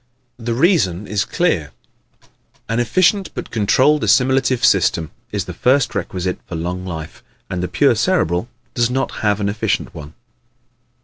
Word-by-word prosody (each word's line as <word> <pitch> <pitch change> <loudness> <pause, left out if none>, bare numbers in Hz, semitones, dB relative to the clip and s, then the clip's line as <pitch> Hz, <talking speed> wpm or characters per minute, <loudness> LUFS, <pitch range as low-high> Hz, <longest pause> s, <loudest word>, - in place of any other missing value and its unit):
The 115 0 -2
reason 120 - +2
is 100 -1 -1
clear. 100 - 0 1.0
An 115 +1 -1
efficient 185 - +2
but - - -6
controlled 130 +7 +3
assimilative 130 +4 +3
system 80 -1 +2 0.2
is 100 -3 -2
the 90 - -7
first 130 +8 +2
requisite 90 0 -3
for 90 - -6
long 90 +3 -3
life, 80 -3 -7 0.3
and 90 -1 -2
the 90 - -1
pure - - +3
Cerebral 85 +8 0 0.2
does 120 0 +1
not 135 +2 -1
have 105 -1 +1
an 100 - -1
efficient 105 +2 -1
one. 75 0 -10
105 Hz, 145 wpm, -19 LUFS, 90-130 Hz, 1.0 s, controlled